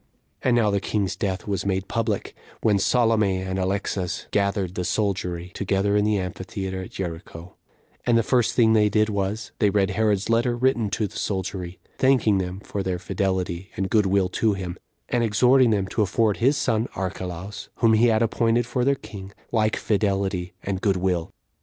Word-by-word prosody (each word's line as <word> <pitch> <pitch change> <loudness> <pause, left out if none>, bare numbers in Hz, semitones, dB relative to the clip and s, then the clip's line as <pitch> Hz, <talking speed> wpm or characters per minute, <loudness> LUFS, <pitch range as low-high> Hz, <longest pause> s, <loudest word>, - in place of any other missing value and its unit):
And 125 -2 +2
now 110 -3 +3
the 100 - +1
king's 100 -3 -1
death 95 0 -3
was 100 -3 -1
made 95 -1 -1
public, 110 -3 -2 0.3
when 105 -3 +3
Salome 110 -3 +2
and 95 0 -3
Alexas 95 -1 -2
gathered 100 -2 0
the 90 - -3
soldiery 90 -2 -2
together 100 +1 0
in 105 - +3
the 105 -1 +2
amphitheater 95 0 -4
at 95 - -8
Jericho; 85 -1 -7 0.5
and 120 -1 +3
the 115 - +3
first 120 0 +2
thing 110 -2 +5
they 105 -1 +4
did 110 +1 +2
was, 100 +1 -2
they 105 - +4
read 100 -1 +1
Herod's 105 -1 +1
letter, 120 +1 +2
written 120 -4 +1
to 105 - -1
the 100 - -6
soldiery, 95 -2 -3 0.2
thanking 125 -7 +3
them 95 +1 -4
for 100 - -4
their 95 -2 -1
fidelity 95 0 -2
and 95 0 -2
good 105 -3 +3
will 95 -1 +2
to 110 +3 +1
him, 95 -3 -5 0.3
and 120 -1 +1
exhorting 125 +4 +4
them 100 -3 +1
to 110 - -1
afford 105 +1 +2
his 135 +5 +3
son 115 -4 +1
Archelaus, 95 +1 -5
whom 115 -2 +3
he 115 +2 +5
had 110 0 +3
appointed 115 +1 +1
for 125 +1 -1
their 140 +2 +3
king, 100 -6 -10 0.2
like 110 -2 +2
fidelity 95 -3 -1
and 95 -1 -3
good 100 -3 +2
will. 90 -2 -1
100 Hz, 185 wpm, -24 LUFS, 95-110 Hz, 0.5 s, thing